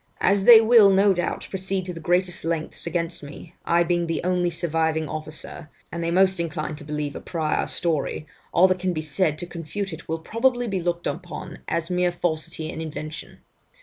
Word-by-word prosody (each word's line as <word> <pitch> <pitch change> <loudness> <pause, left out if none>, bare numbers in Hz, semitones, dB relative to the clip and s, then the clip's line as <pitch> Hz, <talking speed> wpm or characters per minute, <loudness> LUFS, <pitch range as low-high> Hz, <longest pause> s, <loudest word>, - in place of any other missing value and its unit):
'As 195 0 +2
they 235 -2 +11
will 225 -2 +7
no 195 +1 +5
doubt 175 -1 -2
proceed 190 -1 -2
to 180 - -4
the 165 - -8
greatest 180 +2 +1
lengths 165 0 -2
against 170 0 -2
me, 155 +3 -11
I 170 +1 +3
being 175 0 0
the 165 - -2
only 180 -1 +1
surviving 160 -1 0
officer, 155 +1 -6 0.2
and 170 0 -4
they 165 - 0
most 190 +1 +3
inclined 155 -2 -3
to - - -10
believe 150 -1 -4
a - - -6
prior 160 -3 -1
story, 155 -3 -1 0.3
all 180 +2 +6
that 185 0 +1
can 180 0 -1
be 155 -1 -3
said 155 +1 0
to 175 - -5
confute 175 +3 -5
it 160 0 -10
will 160 - 0
probably 245 +8 0
be 195 -4 -2
looked 170 0 -2
upon 175 0 -5
as 170 +1 -2
mere 180 0 +2
falsity 165 -2 -3
and 160 - -6
invention. 155 -1 -7
170 Hz, 195 wpm, -24 LUFS, 160-185 Hz, 0.3 s, they